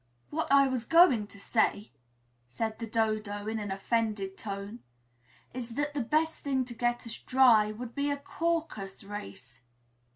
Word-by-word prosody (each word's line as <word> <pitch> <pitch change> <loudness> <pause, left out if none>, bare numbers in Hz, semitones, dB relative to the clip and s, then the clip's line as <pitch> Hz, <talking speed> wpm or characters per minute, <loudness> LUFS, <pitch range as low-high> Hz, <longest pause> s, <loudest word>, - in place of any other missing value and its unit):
"What 320 -1 -2
I 275 0 +7
was 255 -3 -1
going 280 - +5
to 200 - -14
say," 210 0 0 0.6
said 220 - -3
the 230 - -4
Dodo 215 -2 -1
in 220 +1 -2
an 205 -1 -4
offended 200 -1 -1
tone, 200 +2 -6 0.7
"is 240 -2 -6
that 290 +1 -1
the 290 - -1
best 310 +6 0
thing 265 -2 0
to 245 - -8
get 240 +1 -1
us 230 0 -7
dry 240 -5 +5
would 235 +2 -7
be 285 +1 -1
a 285 - 0
Caucus 305 -12 -3
race." 130 - -8
230 Hz, 160 wpm, -30 LUFS, 210-270 Hz, 0.7 s, I